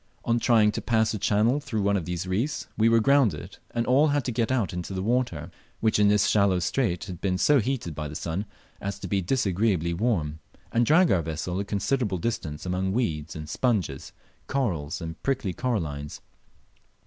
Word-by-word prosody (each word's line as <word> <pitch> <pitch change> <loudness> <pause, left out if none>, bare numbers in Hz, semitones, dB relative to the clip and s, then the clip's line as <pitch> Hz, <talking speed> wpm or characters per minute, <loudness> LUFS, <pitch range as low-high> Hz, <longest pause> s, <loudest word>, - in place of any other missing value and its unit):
On 120 0 +2
trying 110 -3 +4
to - - -4
pass 110 -2 +1
a 105 - -3
channel 110 +8 +2
through 120 -8 -3
one 100 0 +2
of 90 -5 -1
these 90 0 -3
reefs 110 +11 -1
we 115 +1 +4
were 115 0 +5
grounded, 115 - +2
and 115 0 -1
all 140 +5 +4
had 145 -2 0
to 125 - -1
get 115 +1 0
out 120 -8 0
into 90 +2 -5
the 95 - -2
water, 110 -8 -1 0.3
which 110 -1 +2
in 105 - +5
this 105 0 +4
shallow 100 -3 +3
strait 90 +1 0
had 90 -6 -8
been 95 -2 0
so 145 +8 +4
heated 115 - -2
by 75 0 -4
the 75 - -8
sun 85 +7 -3 0.3
as 100 0 -3
to - - -7
be 100 -1 0
disagreeably 95 -4 +1
warm, 85 -7 -1 0.3
and 115 0 +2
drag 170 +3 +5
our 90 - +3
vessel 80 +3 -3
a - - 0
considerable 105 0 0
distance 85 -7 -3
among 95 +1 -1
weeds 80 -10 -2
and 75 -1 -6
sponges, 95 - -1 0.4
corals 90 - -2
and 80 0 -7
prickly 130 -9 -1
corallines. 80 - -3
100 Hz, 195 wpm, -26 LUFS, 85-120 Hz, 0.4 s, were